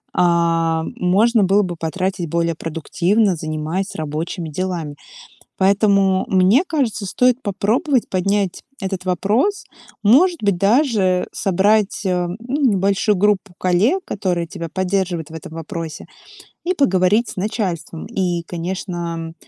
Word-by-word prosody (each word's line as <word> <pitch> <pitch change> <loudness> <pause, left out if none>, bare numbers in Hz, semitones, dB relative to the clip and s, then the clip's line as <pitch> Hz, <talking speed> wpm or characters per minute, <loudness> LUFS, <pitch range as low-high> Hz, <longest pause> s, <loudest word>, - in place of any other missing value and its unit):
а, 165 -2 +2
можно 210 +5 +3
было 195 +2 +3
бы 180 -2 -4
потратить 175 +1 -3
более 170 0 0
продуктивно, 175 +6 0
занимаясь 155 +5 -3
рабочими 160 +2 -4
делами. 170 -3 -3 0.6
Поэтому, 195 -1 +3
мне 190 - +4
кажется, 265 - -1
стоит 250 +6 +2
попробовать 230 - 0
поднять 195 0 -1 0.2
этот 190 -1 -4
вопрос. 215 - 0 0.4
Может 320 - +5
быть, 200 -3 +2
даже 200 - +2
собрать, 200 +2 +1
э, 180 -1 0
ну 250 +6 -3
небольшую 200 -2 +2
группу 205 0 +1
коллег, 195 - +2
которые 180 -4 -2
тебя 165 0 -7
поддерживают 185 -3 -1
в 160 - -12
этом 160 0 -9
вопросе, 165 0 -6 0.6
и 365 +2 0
поговорить 205 - +2
с - - -8
начальством. 185 -5 -3
И, 180 -6 -1
конечно, 170 -1 -4
190 Hz, 120 wpm, -19 LUFS, 170-210 Hz, 0.6 s, Может